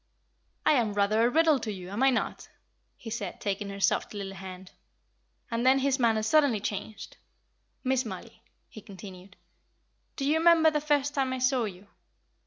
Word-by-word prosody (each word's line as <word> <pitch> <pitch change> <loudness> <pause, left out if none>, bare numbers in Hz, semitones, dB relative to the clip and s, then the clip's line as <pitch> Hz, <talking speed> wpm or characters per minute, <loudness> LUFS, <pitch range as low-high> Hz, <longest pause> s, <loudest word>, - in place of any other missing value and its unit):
"I 310 - +5
am 235 -8 +2
rather 205 +2 +2
a 240 - +4
riddle 315 0 +3
to 220 -2 -4
you, 185 -2 -8
am 205 +5 -3
I 270 - +6
not?" 260 - -2 0.5
he 225 - -9
said, 205 -5 -5
taking 200 0 -3
her 200 0 -7
soft 200 - 0
little 195 -1 -5
hand. 190 -1 -10 0.8
And 230 +1 -1
then 260 +1 +5
his 270 0 +1
manner 225 -3 +2
suddenly 275 -2 +3
changed. 205 +1 -6 0.7
"Miss 260 -1 +1
Mollie," 225 - -9 0.3
he 215 - -12
continued, 190 -1 -12 0.8
"do 275 - -3
you 305 +3 +2
remember 325 -1 +5
the 300 -1 -1
first 290 -1 +1
time 265 -2 0
I - - -2
saw 255 -1 +1
you? 190 -1 -8
230 Hz, 175 wpm, -28 LUFS, 200-275 Hz, 0.8 s, I